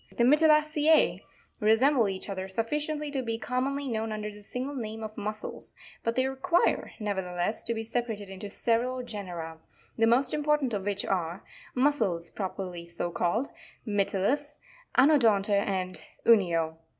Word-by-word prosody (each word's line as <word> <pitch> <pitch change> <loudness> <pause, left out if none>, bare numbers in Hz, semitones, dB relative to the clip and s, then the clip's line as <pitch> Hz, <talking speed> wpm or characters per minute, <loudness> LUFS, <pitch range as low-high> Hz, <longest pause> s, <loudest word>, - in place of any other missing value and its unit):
The 235 - +1
Mytilacez 305 +2 +4 0.4
resemble 225 +2 +4
each 190 -1 -5
other 190 -1 -4
sufficiently 295 +8 -2
to 275 -2 -1
be 230 -2 -2
commonly 260 +5 -2
known 220 -2 -2
under 210 0 -4
the 210 0 -13
single 255 +7 -3
name 220 -4 -5
of 215 0 -6
Mussels, 215 +1 -6 0.3
but 230 0 0
they 255 +1 +2
require, 270 +7 +1
never 205 -3 -1
theless, 180 +3 -2
to 235 - -1
be 225 - -3
separated 225 -3 -3
into 195 +1 -7
several 245 +4 0
genera, 175 -8 -6 0.4
the 225 - +5
most 250 +3 +3
important 295 -4 +1
of 200 -2 -2
which 205 -1 -1
are, 175 -1 -2 0.3
Mussels 220 - +1
properly 185 -3 -5
so 170 0 -4
called,—Mytilus,— 215 - -1 0.4
Anodonta, 235 -8 +5
and 190 -2 -1 0.2
Unio. 170 -8 +3
220 Hz, 140 wpm, -28 LUFS, 195-265 Hz, 0.4 s, the